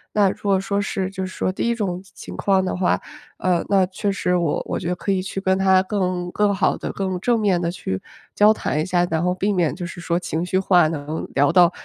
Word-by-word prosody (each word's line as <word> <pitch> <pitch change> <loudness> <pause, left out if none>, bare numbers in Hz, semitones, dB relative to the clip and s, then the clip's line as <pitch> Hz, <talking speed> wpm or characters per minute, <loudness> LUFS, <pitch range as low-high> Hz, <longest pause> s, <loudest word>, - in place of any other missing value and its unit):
那 205 -2 +4
如 - - -12
果 200 -2 +3
说 200 +1 -1
是 190 -2 -2
就 190 -1 -4
是 185 - -7
说 - - -1
第 185 - -4
一 - - +2
种 195 -6 -2
情 190 - -21
情 - - -9
况 195 -1 +2
的 185 - -2
话， 180 0 +1 0.4
呃， 180 -2 +1
那 195 -2 +4
确 195 +2 -2
实 180 -2 0
我 170 -4 0
我 - - -2
觉 170 - -3
得 180 - 0
可 195 - -1
以 185 - 0
去 195 +1 -4
跟 190 -1 +1
他 190 -1 +4
更 185 -3 -2
更 210 -1 +2
好 190 - +1
地、 - - -4
更 190 -2 -2
正 240 +1 +2
面 190 -5 +2
地 170 - -1
去 175 - -4 0.3
交 210 +1 +6
谈 150 - -2
一 - - -1
下， 175 -1 +2
然 160 0 0
后 180 0 +2
避 200 +3 0
免 175 -5 +1
就 175 +2 -6
是 175 0 -8
说 170 0 0
情 170 -1 -3
绪 185 +1 +1
化 180 -4 +4
能 155 0 -4
聊 140 +1 +3
到， 175 -2 +6
185 Hz, 280 characters per minute, -22 LUFS, 175-195 Hz, 0.4 s, 交